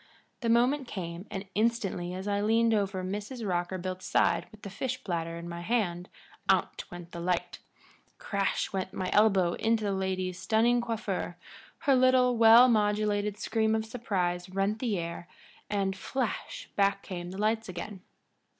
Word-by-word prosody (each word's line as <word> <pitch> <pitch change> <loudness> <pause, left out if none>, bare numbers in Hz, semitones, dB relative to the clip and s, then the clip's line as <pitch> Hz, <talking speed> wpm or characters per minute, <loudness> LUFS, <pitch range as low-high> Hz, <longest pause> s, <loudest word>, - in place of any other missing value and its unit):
The 235 - -1
moment 250 +4 +3
came, 175 -1 -6
and 195 +1 -5
instantly 205 -5 0
as 190 +2 -5
I 205 0 +1
leaned 225 +2 +3
over 195 -3 0
Mrs. 210 +5 -4
Rockerbilt's 185 +1 -2
side - - +2
with 215 -1 -17
the 200 - -5
fish 255 +4 -3
platter 165 -2 -3
in 170 0 -7
my 170 0 -6
hand 180 -4 -1 0.4
out - - +2
went 175 -1 -9
the 170 - -7
light; 175 0 -1 0.6
crash 200 -1 -1
went 190 -1 -3
my 185 -1 -3
elbow 195 -5 +4
into 225 -1 +1
the 205 - 0
lady's 185 -1 -2
stunning 235 +2 +3
coiffure; 215 -7 -3 0.4
her 275 - +3
little, 255 -1 +4
well 230 +2 +8
modulated 210 -2 +1
scream 220 0 +1
of 220 0 -1
surprise 185 -6 -2
rent 195 +3 0
the 225 -5 0
air, 170 0 -5 0.4
and, 195 -2 0
flash, 235 +5 -3
back 200 0 +2
came 175 -2 -6
the 190 - -7
lights 220 +1 0
again. 185 +2 -6
200 Hz, 160 wpm, -29 LUFS, 185-225 Hz, 0.6 s, well